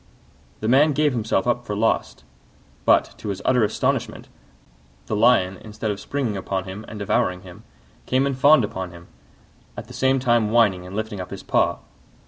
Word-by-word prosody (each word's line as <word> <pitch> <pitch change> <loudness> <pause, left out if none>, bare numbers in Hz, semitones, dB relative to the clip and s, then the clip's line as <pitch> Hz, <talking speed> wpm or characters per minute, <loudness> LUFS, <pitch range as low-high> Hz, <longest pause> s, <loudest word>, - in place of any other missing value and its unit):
The 110 - -2
man 145 +5 +4
gave 150 0 +2
himself 115 -2 0
up 120 0 0
for 105 - -4
lost: 110 +2 -1 0.6
but, - - +3
to 105 - -6
his 95 -1 -3
utter 125 -3 +3
astonishment, 105 - -1 0.8
the 110 - -2
Lion, 105 -4 +3
instead 110 +2 -5
of 100 - -5
springing 125 -1 -3
upon 95 0 -3
him 95 +3 -8
and 110 - -8
devouring 90 -2 0
him, 90 -2 -12 0.5
came 130 +2 +2
and 140 -1 -1
fawned 140 0 +5
upon 95 -3 -4
him, 85 0 -14 0.7
at - - -6
the - - -13
same 130 0 +2
time 120 -4 +2
whining 105 -6 +2
and 95 - -9
lifting 110 -2 -4
up 90 - -8
his - - -8
paw. - - +1
110 Hz, 180 wpm, -22 LUFS, 95-125 Hz, 0.8 s, fawned